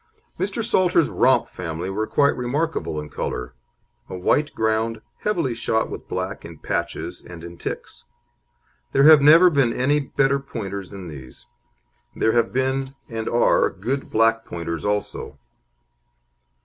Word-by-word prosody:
Mr. 205 +3 -1
Salter's 180 -7 +3
Romp 130 - +3
family 85 0 -5
were 105 +3 -2
quite 140 +6 +3
remarkable 130 - -2
in 75 - -6
colour 60 -4 -4 0.6
a 95 - -5
white 145 +11 +1
ground, 110 0 0 0.2
heavily 170 - 0
shot 115 -1 -1
with - - -8
black - - -4
in - - -10
patches - - -4
and 85 -2 -11
in 85 0 -9
ticks. - - -7 0.9
There 135 - +4
have 155 -1 +9
never 165 +5 +7
been 135 -6 +3
any 145 +4 +2
better 140 0 +1
Pointers 100 -8 -6
than 95 -3 -9
these. 65 -5 -11 0.7
There 110 - +2
have 115 -1 +2
been, 130 +1 -1
and 115 -1 -3
are, 120 - +3
good 135 +2 -4
black 115 0 +3
Pointers 85 -4 -5
also. 105 0 -2
115 Hz, 140 wpm, -23 LUFS, 95-140 Hz, 0.9 s, have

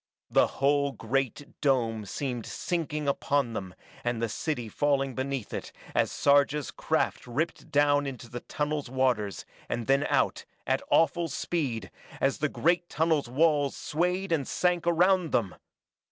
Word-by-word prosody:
The - - +5
whole 140 0 +1
great 135 +4 -3
dome 115 -7 +1
seemed 125 +1 -3
sinking 150 -4 -2
upon 140 -3 +1
them 95 -4 -5 0.3
and 120 -1 -1
the 115 0 -1
city 125 0 -2
falling 135 +2 +1
beneath 130 -3 -3
it - - -5 0.2
as - - +2
Sarja's 145 0 +3
craft - - -1
ripped 155 +6 -2
down 145 -1 +3
into 125 -3 -7
the 120 +1 -6
tunnel's 150 -1 -3
waters, 125 -6 0 0.2
and 120 - -2
then 135 +3 +3
out, - - +1 0.2
at - - +1
awful 170 +1 +3
speed, 135 - -2 0.3
as 135 0 +1
the 150 - +1
great 175 +3 +1
tunnel's 160 -5 +1
walls 145 +1 +2
swayed 180 +4 -1
and 145 -5 +1
sank 175 -1 +1
around 180 0 +3
them! 100 -6 +1
140 Hz, 145 wpm, -28 LUFS, 125-155 Hz, 0.3 s, The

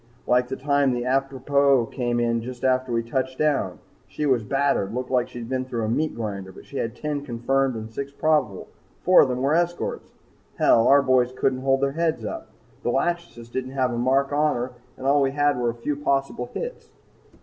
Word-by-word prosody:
Like 125 0 +3
the 135 - -4
time 140 -1 +2
the 120 0 -2
'Atropos' 135 0 +2
came 120 -2 -1
in 115 -1 +1
just 125 +1 -8
after 130 -1 +1
we 115 0 0
touched 130 +2 -2
down. 140 -12 0 0.3
She 150 - -4
was 130 -4 +3
battered 120 -4 0
looked 125 0 -4
like 125 -2 +1
she'd 120 -2 -7
been 130 +1 -1
through 120 -3 -3
a 110 - -1
meat 155 +7 0
grinder, 100 -4 -5
but - - -14
she 140 - -8
had 115 -1 -2
ten 145 +1 -3
confirmed 135 +1 0
and 110 0 -6
six 140 +2 -5
probable, 150 -10 +1
and - - -29
four 185 0 +7
of 135 - +3
them 125 +1 -2
were 140 +2 +2
escorts! 175 +1 -1 0.5
Hell! 115 - +4
Our 140 +1 +6
boys 130 -2 +3
couldn't 130 0 0
hold 135 0 +2
their 140 0 +2
heads 160 +1 -1
up. 330 0 -5 0.3
The - - -1
'Lachesis' 170 -9 -2
didn't 130 +1 -4
have 130 -2 0
a - - -2
mark 135 +3 +2
on 150 +1 +2
her 125 +1 -3 0.3
and 130 - -8
all 140 +1 +4
we 135 -1 +1
had 145 -2 +2
was 120 -1 +1
a - - -2
few 145 +5 -2
possible 140 -3 -1
hits. - - -6
130 Hz, 215 wpm, -24 LUFS, 120-140 Hz, 0.5 s, four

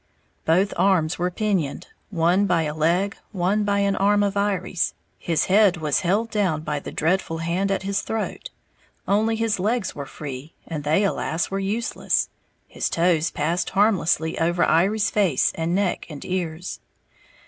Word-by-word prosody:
Both 185 +5 +2
arms 175 -3 +2
were 180 +1 +1
pinioned, 180 -6 -1 0.2
one 180 +2 +2
by 170 -3 +2
a 150 -1 -2
leg, 175 +6 +1
one 200 +2 +1
by 200 0 +1
an 200 0 +1
arm 205 +1 +3
of 200 0 0
Iry's, 200 -3 0 0.2
his 165 -2 0
head 195 -2 +4
was 150 -4 0
held 205 +6 0
down 185 -8 0
by 150 -2 -2
the - - -8
dreadful 165 0 0
hand 170 +4 -1
at 195 -1 -1
his 200 +1 -1
throat; 220 -1 -4 0.6
only 220 +3 +2
his 225 -3 0
legs 215 +1 0
were 140 -1 -7
free, 140 +1 -8
and 155 -3 -5
they 155 +7 +2
alas, 170 -4 -1
were 195 - -1
useless, 210 +4 -1 0.4
his - - -2
toes 165 -1 +2
passed 165 +4 -1
harmlessly 180 -6 +1
over 170 +2 +2
Iry's 200 +7 +2
face 185 -11 +2
and 165 +2 -1
neck 195 -2 -1
and 150 -3 -8
ears! 180 -1 -3
180 Hz, 160 wpm, -23 LUFS, 165-200 Hz, 0.6 s, head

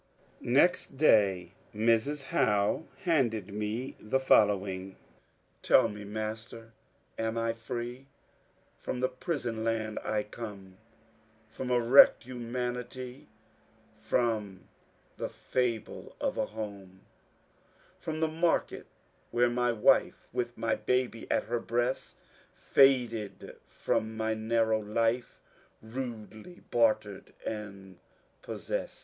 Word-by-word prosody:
Next 140 +2 +2
day 95 - +4 0.2
Mrs. 115 +6 +2
Howe 105 +3 +1 0.2
handed 120 - +1
me 105 +5 -3
the 120 +5 0
following: 100 -6 +2 0.3
— - - -40
Tell - - +5
me, 105 0 -8
master, 110 +2 -6 0.5
am 110 0 -1
I 115 0 0
free? 120 +3 -6 0.7
From 125 - -4
the 130 0 +1
priBon 125 -5 -3
land 110 -1 -1
I 105 -1 0
come, 105 -3 -9 0.7
From 125 +3 -5
a 125 -1 +3
wrecked 120 +4 +7
humanity, 125 +1 -5 0.7
From 110 -3 -1 0.5
the - - -2
fMe 120 -3 -3
of - - -1
a - - -1
home, 100 -3 -8 0.5
— - - -33
From 160 0 -4
the 160 - +3
market 165 +2 0 0.4
where 120 +1 +3
m 120 0 0
j 125 0 +2
wife. 105 - +3
With 120 -1 -2
mj 115 -1 -1
baby 125 -2 0
at - - +2
her 120 +1 -2
breast, 120 +3 -2 0.4
Faded 120 -6 +2
from 110 0 -2
my 110 0 0
narrow 110 0 +1
life, 115 +3 -1 0.4
Radelj 115 - -7
bartered 110 -4 +1
and 100 -4 -7 0.4
possest. - - -4
115 Hz, 110 wpm, -30 LUFS, 105-125 Hz, 0.7 s, wrecked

